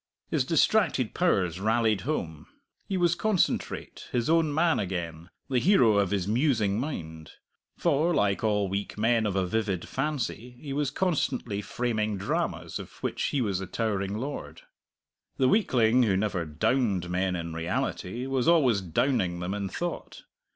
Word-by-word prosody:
His 145 -6 +1
distracted 165 - +2
powers 95 - +1
rallied 110 -1 +2
home; 85 - -4 0.4
he 195 - -1
was 175 -2 +3
concentrate, 200 +1 -1
his 120 +4 0
own 165 -2 +3
man 165 +3 +2
again, 85 -3 -4 0.2
the 130 -2 +1
hero 120 - +4
of 100 -2 +1
his 100 -3 -1
musing 110 -4 +1
mind. 80 - -6 0.4
For, 155 +5 +2
like 105 - +1
all 105 -2 +2
weak 100 +2 -4
men 115 0 +2
of 100 - -2
a 95 -1 +1
vivid 95 -2 -1
fancy, 125 -4 -3
he 140 -1 -6
was 145 -1 0
constantly 140 - -1
framing 110 -2 -1
dramas 95 - -2
of - - -8
which - - -1
he 140 - 0
was 100 -5 0
the 95 - -5
towering 100 -2 -2
lord. 140 +5 -6 0.7
The 130 - +3
weakling 125 - +3
who 100 -6 +3
never 95 -4 -1
"downed" 95 - 0
men 90 +1 0
in 85 -1 -4
reality 90 +7 -3
was 135 0 0
always 135 -12 +4
"downing" 90 - 0
them 90 +2 -3
in 100 -1 -3
thought. 175 - -5
110 Hz, 155 wpm, -27 LUFS, 95-135 Hz, 0.7 s, hero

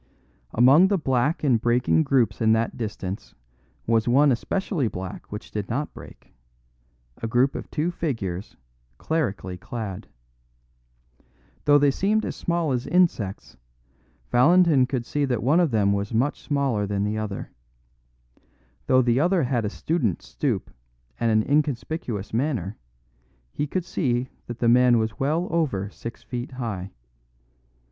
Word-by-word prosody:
Among 135 +10 +6
the 200 0 +1
black 135 0 0
and 125 -6 +3
breaking 120 +6 +2
groups 120 -8 +1
in 110 0 +4
that 110 +1 0
distance 105 -3 -5 0.5
was 115 0 +2
one 140 +4 +5
especially 155 - -1
black 95 -3 -7
which 105 +1 -7
did 105 -3 -4
not 145 +6 -2
break - - -14 0.9
a 115 - -2
group 125 +4 +2
of - - -7
two 160 +3 -1
figures 110 - -4 0.4
clerically 100 - -2
clad. 95 -4 -6 1.6
Though 145 0 +6
they 145 -1 +4
seemed 210 +8 +1
as - - -4
small 170 -3 -1
as 125 -1 -2
insects, 145 - 0 0.7
Valentin 150 +1 +5
could 130 -3 -2
see 145 +4 -1
that 125 -5 -1
one 145 +8 +4
of 170 -3 +3
them 105 -4 +2
was 100 +3 -2
much 130 +6 0
smaller 135 -8 0
than 100 0 -1
the 105 +1 -1
other. 105 -2 -5 1.4
Though 130 0 +5
the 120 +1 +2
other 175 +2 +2
had 120 -3 0
a - - 0
student's 120 - -2
stoop - - -2 0.5
and 115 - +1
an 110 -1 +2
inconspicuous 140 -7 -1
manner, 115 - -1 0.8
he 145 - -2
could 180 +4 -2
see 125 -7 -1 0.2
that 120 - -6
the 120 - 0
man 125 0 +5
was 110 -1 -2
well 155 +6 0
over 120 - -1
six 115 0 -9
feet 125 +1 -6
high. 105 -7 -4
125 Hz, 145 wpm, -24 LUFS, 110-145 Hz, 1.6 s, Among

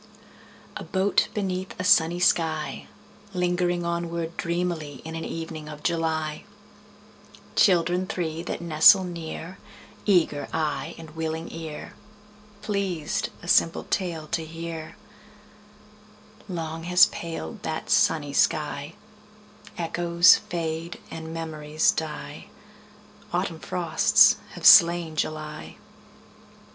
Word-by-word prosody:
A 210 - -7
boat 190 +3 +1
beneath 190 -3 -3
a - - -2
sunny 170 -1 +4
sky, 160 -3 0 0.5
Lingering 175 -1 0
onward 170 -1 -3
dreamily 170 -5 -3
In 160 - -6
an 165 0 -5
evening 160 -2 -6
of 150 -1 -10
July— 160 -2 -1 1.1
Children 180 0 +3
three 165 -3 -3
that 175 - -5
nestle 170 +4 +6
near, 170 0 -7 0.5
Eager 160 -7 +2
eye 150 -4 -2
and 160 -2 -11
willing 160 +1 -4
ear, 160 -2 -7 0.7
Pleased 195 -7 -2
a - - -9
simple 165 -1 +3
tale 170 -5 -2
to 165 - -1
hear— 165 0 -7 1.5
Long 165 -2 -5
has 180 +1 +7
paled 165 - -6
that - - -4
sunny - - +2
sky: - - 0 0.8
Echoes 170 +1 +4
fade 165 0 -5
and 160 0 -7
memories 155 -1 0
die. 160 -1 -6 0.8
Autumn - - -2
frosts - - +4 0.2
have - - -8
slain 170 -1 +7
July. 155 0 -4
165 Hz, 105 wpm, -25 LUFS, 160-175 Hz, 1.5 s, has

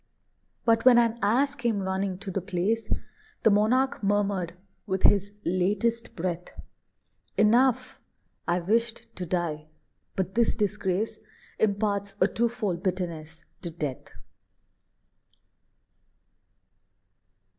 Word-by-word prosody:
But 225 -1 +4
when 250 -2 +8
an 235 -1 +3
Ass 255 +8 +3
came 235 -7 -1
running 190 0 -1
to 195 0 -6
the 195 - -2
place, 200 +4 -1 0.5
The 220 - +6
monarch 245 +6 +2
murmured, 200 -4 0 0.3
with 190 -1 -1
his 200 0 +4
latest 205 +6 0
breath, 175 0 -4 0.8
"Enough! 235 +4 +3 0.5
I 175 +1 +1
wished 225 +5 0
to 180 -1 -4
die, 160 -3 -2 0.5
but 190 0 -2
this 235 +2 +2
disgrace 210 0 -1 0.4
Imparts 200 -1 0
a 185 - +5
twofold 220 -6 -1
bitterness 170 -4 -3 0.2
to 170 - -4
death." 150 -5 -5
200 Hz, 100 wpm, -27 LUFS, 180-225 Hz, 0.8 s, when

